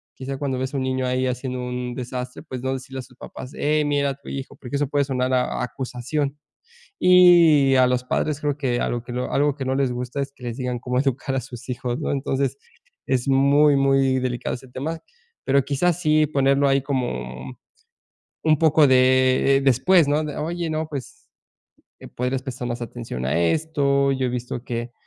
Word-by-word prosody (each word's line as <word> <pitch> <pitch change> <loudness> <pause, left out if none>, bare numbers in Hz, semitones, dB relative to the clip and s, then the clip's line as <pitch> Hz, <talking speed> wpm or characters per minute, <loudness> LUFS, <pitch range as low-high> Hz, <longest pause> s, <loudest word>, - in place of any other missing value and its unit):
quizás 135 +1 -5
cuando 135 -2 -2
ves 130 +1 -3
a - - -1
un 130 - -1
niño 130 0 -1
ahí 130 +1 0
haciendo 125 0 -3
un 125 0 -4
desastre, 125 0 -6
pues 130 -1 -7
no 130 +1 -1
decirle 130 0 -6
a - - -3
sus 125 - -18
papás: 130 +1 -9
"Eh, 150 +1 +1
mira 145 -1 +1
a - - -6
tu 140 - -20
hijo", 135 +1 -6
porque 125 +1 -7
eso 145 0 0
puede 145 -1 +1
sonar 130 -1 -1
a 125 -1 0
acusación, 135 +3 -3 0.6
y 170 -6 +6
a 130 -1 +5
los 125 0 0
padres, 150 +3 -1
creo 145 -2 -1
que 125 -4 0
algo 120 -1 -2
que 120 - -8 0.2
algo 145 0 +2
que 135 - -4
no 130 - 0
les 135 -2 +1
gusta, 125 +3 -4
es 140 0 -6
que 130 - -14
les 120 -1 -4
digan 125 -2 -2
cómo 125 +1 -1
educar 135 0 -1
a - - +1
sus 125 0 -11
hijos, 125 0 -3
¿no?, - - -2
entonces, 135 0 -1 0.5
es 130 0 0
muy 140 +2 +4
muy 135 -1 +3
delicado 125 -1 -2
ese 130 +1 -14
tema, 155 +6 -5 0.4
pero 135 0 +2
quizás, 170 +5 0
sí 155 -2 +3
ponerlo 140 -1 +2
ahí, 135 0 +2
como, 65 - -3
mm, 65 - -10 0.9
un 155 -1 +4
poco 155 -2 +5
de, 130 +1 +4
después 145 +6 +4
¿no?, 145 +2 +2 0.2
"Oye, 170 +1 -3
no, 155 0 -2
pues 140 -4 -8 0.9
podrías 125 +1 -1
prestar 130 -2 -5
más 120 0 -4
atención 115 - -6
a 75 +6 +1
esto, 140 - +1
yo 130 -1 -1
he - - -1
visto 125 0 -4
que 120 -1 -4
135 Hz, 195 wpm, -23 LUFS, 125-145 Hz, 0.9 s, y